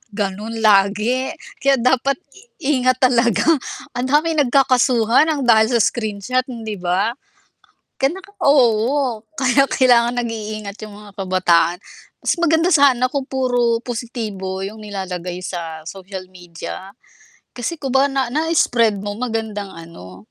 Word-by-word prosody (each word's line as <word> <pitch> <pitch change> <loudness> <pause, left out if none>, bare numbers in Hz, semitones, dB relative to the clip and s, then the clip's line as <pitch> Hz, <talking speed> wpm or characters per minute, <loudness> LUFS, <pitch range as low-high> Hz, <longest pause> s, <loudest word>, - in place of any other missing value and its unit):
Gano’n 210 +1 -4
lagi 210 +5 +3 0.3
kaya 275 0 +3
dapat 260 +2 +1 0.5
i 270 -2 +2
ingat 255 0 +3
talaga. 235 -5 +2 0.5
Ang 250 +1 -3
daming 305 +2 +2
nagkakasuhan 250 0 +3
ng 280 - -3
dahil 220 -2 +5
sa - - +2
screenshot, 225 +4 -1
hindi 225 -4 -6
ba? 185 +6 0 0.8
Ka 270 0 +1
naka 385 +2 -11
oo, 250 -2 +2 0.2
kaya 265 +1 +4
kailangan 245 -3 +3
nag-iingat 215 -3 -5
yung 215 - -10
mga 205 -1 -14
kabataan. 180 -3 +2 0.4
Mas - - +1
maganda 335 0 +2
sana 275 -5 +4
kung 275 0 -3
puro 245 -3 +1
positibo 220 -6 -5
yung 205 +3 -6
nilalagay 185 -3 -5
sa 165 -3 -6
social 190 0 -8
media. 180 +1 -9 0.6
Kasi 250 +7 -4
kumbaga 270 -1 +2
na 270 0 0
na-spread 245 -9 +1
mo 205 0 -5
magandang 220 -4 -3
ano, 100 - -13
230 Hz, 125 wpm, -19 LUFS, 200-260 Hz, 0.8 s, dahil